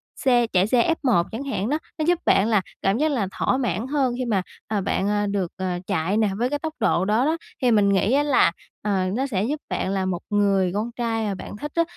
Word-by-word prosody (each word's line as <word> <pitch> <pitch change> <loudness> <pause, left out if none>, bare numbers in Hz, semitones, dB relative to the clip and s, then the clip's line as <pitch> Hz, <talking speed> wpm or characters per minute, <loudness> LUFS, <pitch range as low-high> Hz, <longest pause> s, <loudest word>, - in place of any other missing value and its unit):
xe 245 -3 +2
chạy 190 -2 +2
xe 245 +1 +3 0.2
F1 235 -10 +3
chẳng 225 +5 -4
hạn 245 -6 -2
đó. 300 +2 0 0.2
Nó 310 - +1
giúp 350 0 +2
bạn 195 - +4
là 215 -4 +3 0.2
cảm 195 +3 +1
giác 310 +3 +1
là 225 -8 0
thỏa - - +2
mãn 230 -2 -1
hơn 270 -3 +1
khi 255 - -2
mà, 210 -5 +1 0.3
à, 210 -2 -1
bạn, 195 +1 -1
ờ, 205 0 +1
được, 195 -3 -1
ờ, 185 -2 -2
chạy 165 +6 0
nè, 220 -2 +2
với 245 +2 0
cái 290 - -2
tốc 315 +1 -4
độ 180 - +2
đó 215 +6 +2
đó, 320 +2 +1 0.2
thì 250 - +3
mình 205 -3 +4
nghĩ 195 +4 +2
á 285 +2 +4
là, 285 -11 +4 0.3
ờ, 195 -3 0
nó 265 +5 -1
sẽ 200 -7 -1
giúp 290 +6 -2
bạn - - -2
là 190 -1 0
một 180 -2 -2
người 200 -3 +2
con 215 +4 -2
trai 230 -2 -2
mà 200 -2 -2
bạn 205 - -8
thích 295 +6 -6
á, 335 - +4
220 Hz, 255 wpm, -23 LUFS, 195-260 Hz, 0.3 s, bạn